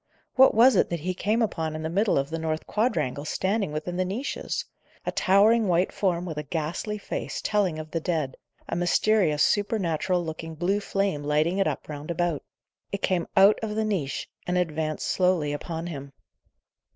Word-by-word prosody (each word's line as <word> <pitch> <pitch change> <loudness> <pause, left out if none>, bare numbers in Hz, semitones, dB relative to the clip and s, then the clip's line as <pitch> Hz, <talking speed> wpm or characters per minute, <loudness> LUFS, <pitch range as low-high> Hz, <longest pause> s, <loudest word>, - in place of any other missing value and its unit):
What 265 -3 +6
was 245 +4 +7
it - - +3
that 170 -2 -3
he 185 +3 -1
came 215 +5 +1
upon 160 -7 -2
in 155 - -5
the - - -1
middle 200 +6 +2
of 140 +2 -1
the 165 - -2
north 160 0 -2
quadrangle, 155 - 0
standing 190 +4 -1
within 155 +4 -4
the 185 - +2
niches? 210 +10 -3 0.4
A - - -1
towering 210 +4 +4
white 180 +1 +2
form, 180 -3 0
with 160 -4 -4
a 150 - -8
ghastly 170 +6 -2
face, 205 - -4
telling 195 -6 0
of 155 0 -7
the 165 - -1
dead; 155 -6 -2 0.3
a - - -3
mysterious, 175 -2 +3
supernatural 185 -4 +1
looking 160 0 -6
blue 180 +6 +1
flame 195 -7 -1
lighting 155 +6 +1
it 195 - +3
up - - -3
round 150 +1 -7
about. 170 -3 0 0.5
It 200 - -4
came 180 -3 +1
out 195 +2 +7
of 215 -1 -3
the 220 0 0
niche, 180 -11 -2 0.2
and 180 0 +1
advanced 155 -3 -1
slowly 180 -6 +1
upon 165 +2 -4
him. 140 -5 -7
175 Hz, 185 wpm, -26 LUFS, 155-200 Hz, 0.5 s, was